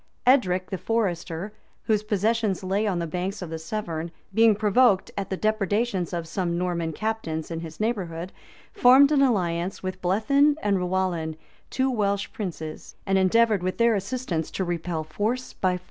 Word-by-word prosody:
[*] - - -42
Edric 185 -9 +3
the 190 - -3
Forester, 190 -3 -2 0.3
whose 215 -2 +1
possessions 215 -1 0
lay 195 +3 0
on 190 -3 0
the 170 - -1
banks 180 +4 -3
of 170 - -7
the 160 - -4
Severn, 170 -2 -4 0.2
being 225 0 +5
provoked 210 0 +3
at 200 - -4
the 190 - -2
depredations 210 -2 0
of 170 -2 -3
some 170 0 -2
Norman 175 -2 -1
captains 165 -5 -3
in 165 - -3
his 165 -1 -9
neighborhood, 185 -6 -2 0.4
formed 265 +4 +6
an 290 -2 +4
alliance 185 -9 0
with 185 0 -4
Blethyn 275 +11 +3
and 200 -2 +2
Rowallan, 180 -3 -1 0.3
two 260 0 0
Welsh 200 -4 0
princes; 170 -9 -6
and 195 -1 +2
endeavored, 215 +2 +3
with 185 +1 -2
their 235 0 +4
assistance, 200 -5 -2
to 190 - -3
repel 170 -2 -2
force 215 +11 -3
by 185 -1 0
force. - - -12
190 Hz, 170 wpm, -25 LUFS, 175-220 Hz, 0.4 s, formed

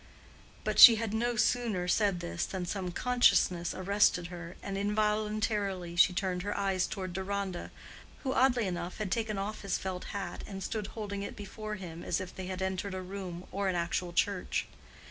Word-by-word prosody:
But - - 0
she 230 - +13
had 220 -1 -2
no 240 +2 0
sooner 220 -5 +1
said 195 -1 +2
this 85 0 -3
than 185 -2 -4
some 185 0 -3
consciousness 185 -7 +3
arrested 185 -2 +2
her, 170 0 -8
and 195 - -4
involuntarily 210 -3 0
she 180 - +6
turned 180 -1 -1
her 205 - -3
eyes 195 -2 +1
toward 185 -3 -5
Deronda, 190 -1 -3 0.5
who 265 -2 0
oddly 250 -3 +3
enough 175 -1 -4
had 210 -4 -3
taken 220 -3 -1
off 205 +2 -3
his 200 - -1
felt 185 -1 -4
hat 195 -3 -5
and 195 -1 -6
stood 215 0 -3
holding 205 -3 -5
it 200 - -5
before 215 +1 -6
him 170 -4 -8
as - - 0
if 185 0 -7
they 185 -1 -6
had 185 0 -3
entered 190 +1 -2
a 185 - -3
room 185 -2 -6
or 200 0 -1
an 185 - 0
actual 175 +1 -1
church. 185 +2 0
195 Hz, 185 wpm, -31 LUFS, 180-210 Hz, 0.5 s, she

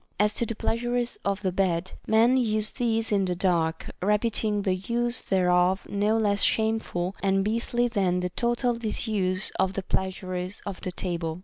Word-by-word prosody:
As 210 0 +3
to 235 - +1
the 230 - -3
pleasures 240 +2 -1
of 200 +1 -1
the 185 - +1
bed, 180 -1 0 0.2
men 230 +3 +4
use 215 -4 +1
these 225 -3 0
in 200 -2 +2
the 180 -1 -1
dark, 170 -3 0 0.2
reputing 210 +1 +1
the 190 - +1
use 235 +6 -1
thereof 180 0 +2
no 210 +2 +1
less 205 -2 +1
shameful 220 -5 0
and 195 0 +2
beastly 235 +2 +1
than 190 -6 +1
the 180 - -1
total 240 +5 0
disuse 215 -4 -1
of 190 0 +2
the 195 - -3
pleasures 185 0 -3
of 200 -2 -6
the 185 - -4
table. 170 -3 -3
200 Hz, 170 wpm, -26 LUFS, 185-225 Hz, 0.2 s, men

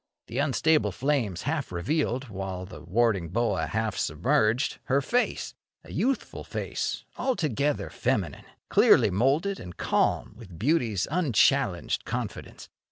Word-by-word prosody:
The 120 +4 -4
unstable 145 -3 +2
flames 120 - -1
half 145 - -2
revealed, 130 - -1
while 95 -3 -5
the 90 - -11
warding 95 -1 +1
boa 100 -5 0
half 110 +5 -1
submerged, 105 - +1
her 135 +1 +2
face— 245 - -1 0.3
a - - -13
youthful 265 +2 -1
face, - - -3
altogether 150 - 0
feminine, 105 - -1 0.2
clearly - - +5
moulded 140 - +1
and 90 -1 -9
calm - - +1
with 100 -7 -12
beauty's 115 - +1
unchallenged 155 - +2
confidence. - - -5
120 Hz, 120 wpm, -27 LUFS, 95-145 Hz, 0.3 s, clearly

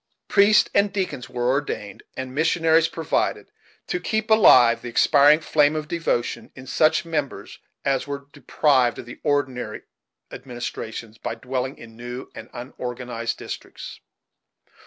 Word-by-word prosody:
Priests 205 +1 +5
and 200 0 +3
deacons 185 -10 -3
were 120 0 0
ordained, 130 -8 -3 0.2
and 130 -1 -5
missionaries 160 +2 +3
provided, 165 -1 -2 0.3
to 355 - -2
keep 220 -7 -2
alive 125 - +6
the 120 - -6
expiring 145 +5 +5
flame 150 -1 +2
of 155 -1 -3
devotion 165 -8 -2
in 130 - -11
such 155 +4 +2
members 150 -4 -4 0.3
as 135 0 0
were 140 0 -5
deprived 130 -2 +2
of - - -8
the 120 - -11
ordinary 130 -6 -2 0.5
administrations 115 -2 -7
by - - -4
dwelling 130 +3 -4
in 115 -1 -13
new 120 +2 -8
and 115 +1 -10
unorganized 120 -2 -5
districts. - - -8
135 Hz, 135 wpm, -23 LUFS, 120-160 Hz, 0.5 s, alive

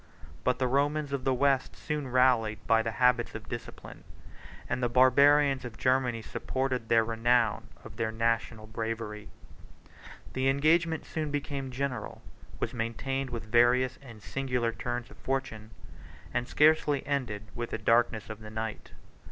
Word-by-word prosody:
But 125 - +1
the 130 - 0
Romans 145 +2 0
of 135 -2 -3
the 135 - +3
West 135 0 +1
soon 150 -3 -4
rallied, 125 -4 +3
by 115 -1 +4
the 115 0 -3
habits 125 0 +2
of 110 -1 -8
discipline; 120 - -8 0.6
and 125 +1 -2
the 120 - +1
Barbarians 135 +2 +5
of 120 -3 -8
Germany 125 -3 +1
supported 130 -2 -3
the 115 -1 +5
renown 115 0 +1 0.2
of 110 - -12
their 110 -2 -1
national 115 -1 -1
bravery. 110 -1 -5 1.0
The 130 +1 +1
engagement 160 +4 +2
soon 155 -2 -3
became 140 -2 -3
general; 130 -3 -4 0.4
was - - -2
maintained 125 +3 -2
with 115 -2 -5
various 120 +3 +3
and 115 -6 -13
singular 125 -1 -1
turns 120 +1 -4
of - - -14
fortune; 130 -5 -3 0.6
and 120 - -1
scarcely 150 -2 +3
ended 125 -8 -2
with 120 -1 -4
the - - -3
darkness 115 -2 +2
of 110 - -8
the 110 -1 -10
night. 110 0 -5
125 Hz, 150 wpm, -29 LUFS, 115-135 Hz, 1.0 s, Barbarians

